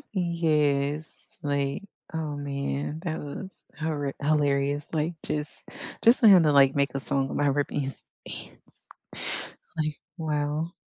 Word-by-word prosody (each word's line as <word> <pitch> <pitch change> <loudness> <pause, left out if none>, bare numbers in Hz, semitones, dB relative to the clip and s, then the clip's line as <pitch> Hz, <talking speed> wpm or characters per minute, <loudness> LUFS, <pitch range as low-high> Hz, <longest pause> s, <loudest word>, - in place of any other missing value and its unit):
Yes, 155 -4 +1 0.3
like, 140 +2 0 0.3
oh 155 -2 -2
man, 140 +2 -3
that 160 -3 -2
was 150 +6 -6 0.3
horri 145 -3 -2
hilarious, 145 -1 +2
like, 160 +2 0
just 150 0 -2 0.5
just 235 +2 +7
for 225 - +7
him 185 -5 +9
to, 150 - +4
like, 135 -1 +6
make 140 -1 +2
a 135 - -1
song 135 0 -1
about 145 -1 +2
ripping 145 0 0
his 135 0 -4 0.3
pants, - - -11 0.9
like, 155 -2 -1 0.2
wow. 155 +1 -1
145 Hz, 130 wpm, -27 LUFS, 140-155 Hz, 0.9 s, him